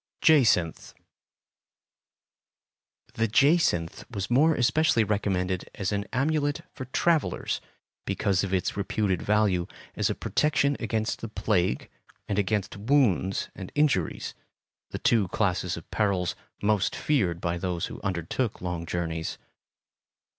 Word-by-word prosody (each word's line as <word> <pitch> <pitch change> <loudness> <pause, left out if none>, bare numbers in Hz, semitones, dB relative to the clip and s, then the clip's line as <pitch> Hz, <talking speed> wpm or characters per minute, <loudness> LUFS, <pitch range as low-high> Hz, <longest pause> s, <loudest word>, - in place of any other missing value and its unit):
Jacinth 115 - +3 2.2
The 115 0 +1
jacinth 125 - +2
was 100 -2 -4
more 150 +6 +5
especially 125 -1 +3
recommended 95 -3 -1
as 100 0 -2
an 100 0 -1
amulet 145 +2 0
for 130 - -6
travellers, 160 +4 0 0.5
because 95 -1 +1
of 95 - -3
its 95 -2 0
reputed 100 -2 0
value 100 -4 +2 0.3
as - - +1
a - - -1
protection 145 -2 +1
against 110 -1 -2
the 115 - -4
plague 90 - 0 0.4
and 100 -1 0
against 100 0 -1
wounds 105 - +1
and 95 -2 -8
injuries, 145 - +1 0.6
the - - -5
two 110 -5 +2
classes 90 -3 0
of 85 - -11
perils 95 -5 +1 0.3
most 105 -2 +2
feared 95 - +1
by 85 -1 -2
those 90 -2 -2
who - - -8
undertook 95 +5 -2
long 90 -2 -4
journeys. 80 -1 -3
100 Hz, 120 wpm, -27 LUFS, 90-125 Hz, 2.2 s, more